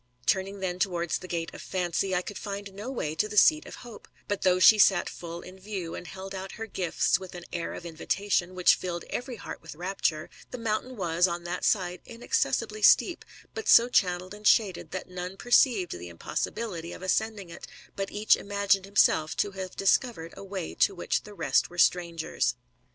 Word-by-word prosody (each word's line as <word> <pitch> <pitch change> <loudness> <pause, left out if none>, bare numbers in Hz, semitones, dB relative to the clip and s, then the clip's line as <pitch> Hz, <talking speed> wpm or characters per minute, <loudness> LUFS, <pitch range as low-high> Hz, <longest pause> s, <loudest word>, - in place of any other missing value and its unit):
Turning 195 0 0
then 180 -1 -2
towards 175 -4 0
the 185 - -9
gate 170 -2 -3
of - - -9
Fancv, 185 +1 -1
I 180 0 +1
could 205 - -7
find 200 -1 -6
no 210 +6 -6
way 155 - -3
to 215 +7 -1
the 210 - -5
seat 310 +7 +5
of - - -9
Hope; 230 -3 -12 0.2
but 205 - -2
though 185 -1 +4
she 210 +4 +7
sat 190 -3 +5
full 170 0 -7
in 185 +1 -12
view, 190 -4 -5
and 180 - -7
held 190 0 -8
out 190 0 -6
her 225 - -6
gifts 190 -2 0
with 185 -1 -10
an 175 -1 -8
air 170 -1 -3
of - - -8
invitatiooi 175 +3 -1
which 185 -1 +4
filled 175 -2 -4
every 245 0 -4
heart 200 - -8
with 160 -2 -10
rapture, 175 -3 -2 0.2
the 250 - -6
mountain 230 +2 -2
was, 175 -1 +2
on 170 0 -4
that 175 +1 -4
side, 180 -3 +1
inaccessibly 430 - -1
steep, 350 - +5 0.3
but 440 - -6
so 235 - +8
channelled 185 -4 +1
and 210 0 -3
shaded, 195 -6 +3
that 185 - -5
none 180 +1 -6
perceived 230 -5 +3
the 90 - -7
iropossibihty 170 - -4
of - - -11
ascending 200 -1 -1
it, - - -10 0.3
but 195 0 -3
each 210 +1 +3
imagined 200 -1 +1
himself 195 -6 +2
to 205 - 0
have 190 -1 -7
discovered 195 -4 +1
a - - -9
way 190 -3 -5
to 195 - +2
which 175 - -1
the 210 - -11
rest - - +1
were 175 - -13
strangers. 170 -9 +1
190 Hz, 200 wpm, -28 LUFS, 175-205 Hz, 0.3 s, so